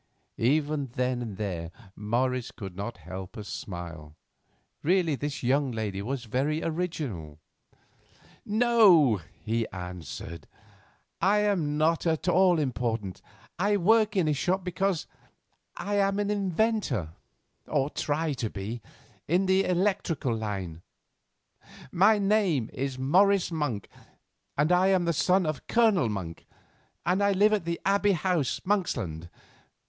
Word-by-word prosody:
Even 145 +3 +1
then 125 -1 0
and 110 -5 -6
there 90 -6 -3 0.3
Morris 125 +3 -1
could 95 -4 -9
not 100 +3 -5
help 95 +5 -7
a 105 - -5
smile; 85 -6 -7 0.7
really 175 -1 +2
this 145 +1 -4
young 135 +2 +2
lady 105 -4 -3
was 125 +4 -3
very 140 +8 -1
original. 150 - -3 1.1
"No," 210 - +5 0.3
he 115 +1 0
answered, 90 -2 -8 0.7
"I 210 +2 +4
am 175 -8 0
not 165 +2 +2
at 160 +1 0
all 180 0 +4
important, 115 - -2 0.4
and 195 - +2
I - - +3
work 215 +3 +3
in 180 -5 +2
a 150 - +2
shop 180 +6 0
because 185 -1 -1 0.7
I 205 +3 -2
am 195 0 +2
an 205 0 0
inventor—or 175 - -2
try 155 +1 -1
to 120 -4 -3
be—in 115 - -4
the 190 +1 +3
electrical 180 - 0
line. 95 -7 -4 1.1
My 210 +5 +5
name 195 - +1
is 135 0 -3
Morris 185 +8 +3
Monk, 145 - -2 0.7
and 150 +4 +2
I 180 +1 +4
am 190 -2 +3
the 170 - +1
son 185 +4 +2
of 155 -2 -4
Colonel 215 - +3
Monk, 90 -6 -6 0.6
and 180 +2 +2 0.2
live 210 +2 +5
at 200 -5 0
the 170 0 -2
Abbey 200 +1 +3
House, 170 -5 0
Monksland. 110 - -1
150 Hz, 125 wpm, -28 LUFS, -, 1.1 s, No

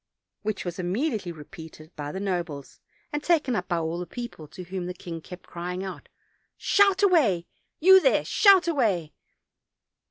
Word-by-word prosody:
which 210 -2 -3
was 175 +1 -5
immediately 195 - -1
repeated 160 +1 -12
by 145 -1 -5
the 190 - -5
nobles, 175 -8 -4 0.3
and 295 - -1
taken 305 -8 +2
up 180 -3 -2
by 175 - 0
all 165 +1 -2
the 180 - -5
people, 235 -11 -8
to 180 +5 -10
whom 180 0 -5
the 180 - -5
king 170 -2 -7
kept 180 +2 -11
crying 180 +2 -5
out: 190 -1 -8 0.5
"Shout 400 -1 +3
away, 255 - +3 0.3
you 380 +3 +8
there, - - +3
shout 390 -4 +5
away!" 205 - 0
185 Hz, 160 wpm, -26 LUFS, 170-275 Hz, 0.5 s, you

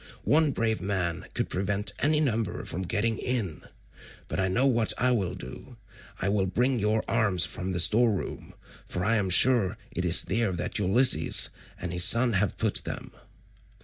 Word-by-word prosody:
One 155 0 +3
brave 115 -4 -2
man 95 -2 -3
could - - -2
prevent 100 +2 -3
any 150 +1 +1
number 115 - -2
from 90 - -5
getting 110 +4 -2
in. 115 -11 -3 0.7
But - - -5
I 95 - 0
know 110 +9 0
what 120 -5 +1
I 125 0 +1
will 100 -7 -2
do, 65 +2 -12 0.4
I 95 - -3
will 100 -1 -1
bring 125 +7 0
you 110 +1 -1
arms 100 -7 +1
from 90 +4 -6
the 90 - -3
store 115 +7 +4
room, 100 - -7 0.3
for 90 0 -5
I 115 +2 +1
am 100 -3 -2
sure 115 +1 +3
it 90 - -5
is 90 -1 +3
there 110 -1 -2
that 90 +3 -4
Ulysses 100 - +4 0.3
and 90 -1 -6
his 90 0 +2
son 120 0 +7
have 100 0 -1
put - - -1
them." - - -8
100 Hz, 180 wpm, -26 LUFS, 90-115 Hz, 0.7 s, son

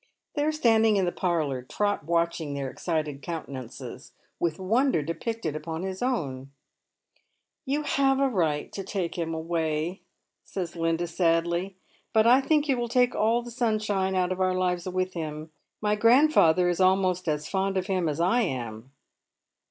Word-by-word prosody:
I'hey 290 0 +1
are - - +3
standing 225 -7 +3
in 195 -2 +2
the 175 - 0
parlour, 155 -9 -1
Trot 205 +6 -1
watching 170 -3 0
fiieir 135 -2 -3
excited 155 -5 -3
countenances, 130 -5 -7 0.3
with 165 -2 0
wonder 220 - +1
depicted 165 +1 -3
upon 160 +2 -5
his 190 0 -4
own. 140 - -2 0.6
" - - -46
You 290 +3 0
have 275 -2 +2
a 275 - +3
right 165 - 0
to 195 - -5
take 190 -3 -3
him 165 -2 -2
away," 160 +1 -2 0.4
says 175 -3 -5
Linda, 165 0 0
sadly, 170 +2 0 0.2
" - - -37
but 220 0 +5
I 250 +3 +6
think 300 +2 +2
you 270 -3 +2
will 240 -1 -2
take 245 +1 +3
all 230 +3 +2
the 240 - -9
sunshine 215 -5 0
of 185 0 0
our 185 0 +2
lives 180 -1 -1
with 185 0 -1
him. 155 -1 -5 0.3
My 210 0 +1
grandfather 230 - +5
is 175 0 0
almost 185 -1 +2
as 150 -1 -1
fond 195 0 -1
of 185 - 0
him 185 -4 0
as 150 +1 -3
I 185 +9 +3
am." 120 - -4
180 Hz, 165 wpm, -27 LUFS, 160-220 Hz, 0.6 s, I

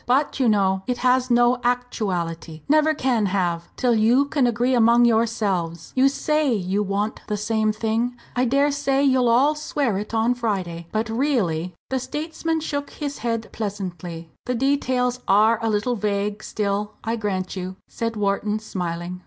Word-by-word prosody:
But, 275 +3 +1
you 255 -3 +3
know, 190 -2 +2
it 250 -1 -1
has 255 0 +2
no 240 +1 +4
actuality 185 -10 -2
never 310 +1 +4
can 245 -7 +1
have 175 -3 -1
till 250 -2 +2
you 230 +5 +4
can 280 -3 +1
agree 240 +2 +1
among 235 0 +5
yourselves. 205 -8 0
You 265 +1 +5
say 300 0 +1
you 195 -2 0
want 205 +2 -2
the 210 - -1
same 215 +1 +1
thing 225 +3 -1 0.2
I 250 +1 +2
dare 280 +4 +2
say 275 -1 +1
you'll 260 -3 +3
all 265 +6 +4
swear 285 -8 -1
it 210 - -6
on 225 +2 +2
Friday 185 -8 -3
but 220 +1 -1
really 215 - 0
" - - -80
The 265 - +1
statesman 320 +4 -3
shook 285 -2 -3
his 285 -2 -5
head 230 -1 -2
pleasantly. 180 -6 -5 0.2
"The 250 - 0
details 255 -1 +1
are 215 +3 +4
a 225 - +1
little 215 +4 0
vague 205 0 -2
still, 205 0 -2
I 225 +1 -1
grant 195 -5 -3
you," 185 0 -5
said 230 0 -3
Wharton, 210 +1 0
smiling. 180 -4 -4
225 Hz, 170 wpm, -23 LUFS, 200-255 Hz, 0.2 s, among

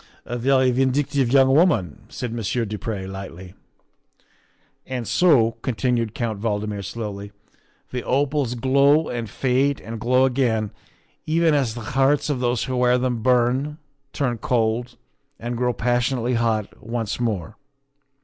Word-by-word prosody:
"A 120 - -4
very 130 +1 +3
vindictive 135 0 +1
young 135 -1 +5
woman," 115 - +2
said 120 -2 -5
Monsieur 115 +1 -1
du 105 0 -5
Pre 100 -2 -4
lightly. 95 -1 -8 1.3
"And 125 -4 -4
so," 130 -11 +3
continued 115 -2 -1
Count 110 -4 -2
Valdmir 105 -2 -2
slowly, 100 -2 -6 0.3
" - - -39
the 125 -1 -3
opals 135 -1 0
glow 140 +5 +3
and 115 -3 -4
fade 130 +4 +1
and 115 0 -7
glow 125 +3 +3
again, 120 -5 0 0.6
even 165 0 +3
as 130 -6 +1
the 120 - -6
hearts 135 +2 +2
of 135 - -2
those 120 -2 0
who 130 -1 -3
wear 125 0 +3
them 125 -2 -1
burn, 130 +5 +1 0.3
turn 125 -5 -1
cold, 120 -3 0 0.4
and 120 +1 -4
grow 125 +1 +1
pas 120 +1 0
sionately 125 0 -1
hot 115 -3 -1
once 115 -1 -3
more. 110 -4 -2
120 Hz, 145 wpm, -22 LUFS, 115-135 Hz, 1.3 s, young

